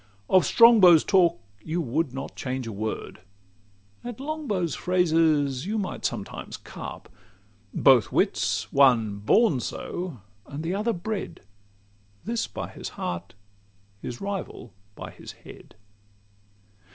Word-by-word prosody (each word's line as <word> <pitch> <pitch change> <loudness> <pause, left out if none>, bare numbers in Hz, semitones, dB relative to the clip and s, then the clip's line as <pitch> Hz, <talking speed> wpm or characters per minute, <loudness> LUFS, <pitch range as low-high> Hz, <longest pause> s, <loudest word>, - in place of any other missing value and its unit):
Of 185 - +5
Strongbow's 210 -9 +7
talk 175 - +3 0.2
you 160 +2 -2
would 145 0 -1
not 135 +1 -7
change 130 -1 -4
a 115 - -5
word: 110 +1 -5 0.8
At 240 -1 -7
Longbow's 270 - -2
phrases 160 -5 +1
you 215 +2 -1
might 200 -3 -4
sometimes - - -4
carp: - - -9 0.6
Both 130 -5 +4
wits 100 +1 0
one 115 -7 +4
born 150 - +3
so, 170 - -5 0.3
and 145 +3 -6
the 170 +3 -2
other 210 +4 0
bred 200 +3 -5 0.8
This 230 +1 -1
by - - -6
his - - -7
heart, 85 +2 -5 0.7
his 120 - -6
rival 195 - -6 0.2
by - - -8
his - - -11
head. - - -15
165 Hz, 120 wpm, -26 LUFS, 125-195 Hz, 0.8 s, Strongbow's